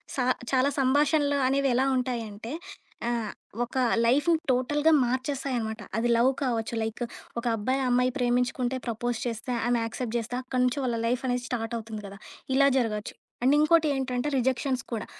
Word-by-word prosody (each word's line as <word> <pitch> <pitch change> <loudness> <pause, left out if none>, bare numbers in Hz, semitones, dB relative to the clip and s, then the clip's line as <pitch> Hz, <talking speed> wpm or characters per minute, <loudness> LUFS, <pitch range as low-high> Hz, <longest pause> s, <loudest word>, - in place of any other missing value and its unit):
సా 265 - +1 0.3
చాలా 265 +1 +3
సంభాషణలు 285 +2 +3
అనేవి 275 +1 +2
ఎలా 260 +2 +3
ఉంటాయి 250 -2 -1
అంటే 210 +3 -8 0.6
ఆహ్, 230 -3 -1 0.3
ఒక 245 - -7 0.3
లైఫ్‌ని 295 +7 +3
టోటల్‌గా 295 +5 +2
మార్చేస్తాయనమాట. 250 -3 -2 0.2
అది 230 +2 +1
లవ్ 245 +3 +4
కావచ్చు. 230 -3 -1
లైక్ 220 +2 -3 0.4
ఒక 235 - -8
అబ్బాయి 255 +6 0
అమ్మాయి 250 +1 +3
ప్రేమించుకుంటే 250 0 0
ప్రపోజ్ 240 +1 -2
చేస్తే, 235 +1 -3 0.2
ఆమె 240 -1 +2
యాక్సెప్ట్ 230 +1 -4
చేస్తే 235 +2 -5
అక్కడి 255 0 -1
నుంచి 250 +3 0
వాళ్ళ 240 -2 0
లైఫ్ 245 +2 0
అనేది 245 -1 0
స్టార్ట్ 230 -2 -3
అవుతుంది 220 -1 -6
కదా! 200 0 -10 0.4
ఇలా 275 +1 +6
జరగొచ్చు. 215 -4 -1 0.3
అండ్ 265 +3 +5
ఇంకోటి 310 +1 +4
ఏంటంటే 260 +1 -1
రిజెక్షన్స్ 260 +1 0
కూడా. 225 -3 -3
250 Hz, 160 wpm, -27 LUFS, 235-265 Hz, 0.6 s, ఇలా